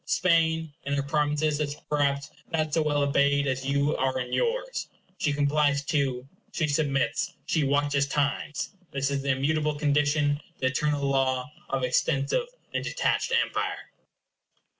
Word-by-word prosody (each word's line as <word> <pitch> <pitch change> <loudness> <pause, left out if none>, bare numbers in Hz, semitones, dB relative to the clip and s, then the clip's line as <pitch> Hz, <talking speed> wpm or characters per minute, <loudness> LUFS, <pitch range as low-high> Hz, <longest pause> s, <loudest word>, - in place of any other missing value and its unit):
Spain, 160 -3 +2
in 140 +1 -3
her 140 - 0
provinces, 150 +1 +1
is, 145 -1 -1
perhaps, 140 -1 0 0.2
not 155 -2 0
so 165 - +3
well 145 -2 +1
obeyed 140 0 +3
as 130 -1 -1
you 140 +2 +1
are 130 0 0
in 125 -1 -4
yours. - - -1 0.3
She 150 - +1
complies, 145 0 +2
too; 135 -5 0 0.2
she 155 - 0
submits; 145 +4 0
she 160 - +1
watches 145 0 +2
times. 145 +1 -1 0.2
This 140 0 -1
is 140 -1 -1
the 140 - -3
immutable 150 +3 +1
condition, 145 0 +2 0.2
the - - -2
eternal 145 +2 +1
law 135 0 +1 0.2
of 135 -1 -1
extensive 140 - +1 0.3
and - - -1
detached - - 0
empire. - - -4
145 Hz, 145 wpm, -27 LUFS, 140-150 Hz, 0.3 s, so